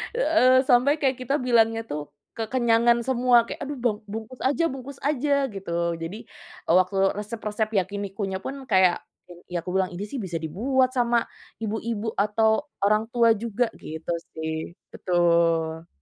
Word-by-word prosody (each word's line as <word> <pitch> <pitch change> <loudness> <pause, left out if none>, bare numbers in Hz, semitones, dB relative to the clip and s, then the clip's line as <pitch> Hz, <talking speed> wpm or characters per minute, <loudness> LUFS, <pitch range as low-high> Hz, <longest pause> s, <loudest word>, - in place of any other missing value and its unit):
Eee, 265 - +4
sampai 250 +4 +5
kayak 265 -2 +1
kita 275 +3 0
bilangnya 225 -2 +3
tuh 150 0 -5 0.3
kekenyangan 235 0 +2
semua 250 -1 +3
kayak - - -7
aduh 285 -1 -5
bang 215 -4 +1
bungkus 225 +3 -7
aja 285 +5 +2
bungkus 270 +1 -9
aja 290 0 0 0.2
gitu 195 -3 -7 0.3
jadi, 175 +6 -5 0.5
eee, 170 - +4
waktu 185 +1 0 0.2
resep-resep 215 0 -3
yakinikunya 195 0 -4
pun 275 - -4 0.2
kayak, 185 -2 +4 0.5
ya 175 - -1
aku 180 - -6
bilang 190 -1 +1
ini 195 - -4
sih 265 +3 -5
bisa 175 -3 -3
dibuat 255 - +1
sama 240 -1 +3 0.5
ibu-ibu 220 0 -3
atau 210 +2 +2 0.4
orang 215 +1 +3
tua 235 -1 +4
juga 235 +2 -1 0.2
gitu 160 +2 -6 0.2
sih 160 0 -4 0.4
betul. 170 -2 +1
220 Hz, 145 wpm, -25 LUFS, 185-250 Hz, 0.5 s, sampai